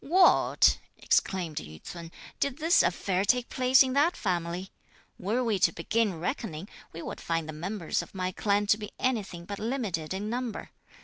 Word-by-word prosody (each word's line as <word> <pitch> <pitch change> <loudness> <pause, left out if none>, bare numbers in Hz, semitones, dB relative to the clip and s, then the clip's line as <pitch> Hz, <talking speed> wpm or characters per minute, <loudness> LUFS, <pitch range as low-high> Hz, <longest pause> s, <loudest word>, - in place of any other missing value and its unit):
"What!" 360 +6 +5 0.2
exclaimed 175 -6 0
Yü 80 +1 -6
ts'un, 170 -1 -8 0.3
"did 280 -1 0
this 325 +2 +4
affair 185 +1 0
take 245 +3 +2
place 255 +1 +5
in 260 -1 -2
that 300 +6 +3
family? 175 -1 -2 0.5
Were 220 +7 0
we 220 -5 +1
to 175 -2 +4
begin 200 +2 0
reckoning, 180 - -4 0.2
we 165 - -8
would - - -6
find 165 -1 -1
the 155 - -6
members 175 +3 -2
of - - -12
my 185 -1 -1
clan 205 +2 +1
to 210 - -6
be 210 -1 -7
anything 205 -9 -2
but 200 +2 -6
limited 215 - -2
in 195 +2 -3
number. 240 -1 -4
200 Hz, 175 wpm, -28 LUFS, 170-245 Hz, 0.5 s, What